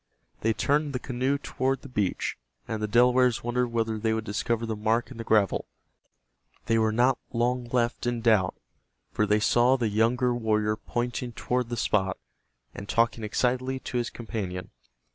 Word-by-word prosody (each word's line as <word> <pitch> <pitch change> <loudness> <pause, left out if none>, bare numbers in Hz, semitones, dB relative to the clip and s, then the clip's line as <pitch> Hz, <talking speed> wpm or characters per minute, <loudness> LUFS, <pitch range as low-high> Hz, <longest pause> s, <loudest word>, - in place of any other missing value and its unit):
They 110 +1 +1
turned 145 +4 +1
the - - 0
canoe 130 +2 -1
toward 135 -1 -2
the - - -8
beach, 105 -8 -1 0.3
and 110 -1 -3
the 105 - 0
Delawares 125 +2 +4
wondered 125 +1 0
whether 115 -2 -1
they 110 0 +1
would 110 - -2
discover 110 +2 -1
the 110 -1 -2
mark 115 +3 0
in 130 - -9
the 115 - -5
gravel. 105 -4 +2 1.0
They 115 0 +2
were 110 0 +2
not 120 +3 +3
long 120 +1 0
left 120 0 -1
in 120 -1 -1
doubt, 110 -6 +3 0.6
for 105 - +1
they 105 +1 +3
saw 120 +4 +4
the 115 -4 0
younger 120 +4 +2
warrior 110 -2 +1
pointing 120 +2 -3
toward 125 +1 -1
the 120 - -3
spot, 95 -4 +1 0.6
and 100 - -9
talking 115 -1 +1
excitedly 130 +4 0
to 125 - -2
his 120 - -2
companion. 95 -6 -5
115 Hz, 170 wpm, -27 LUFS, 110-125 Hz, 1.0 s, Delawares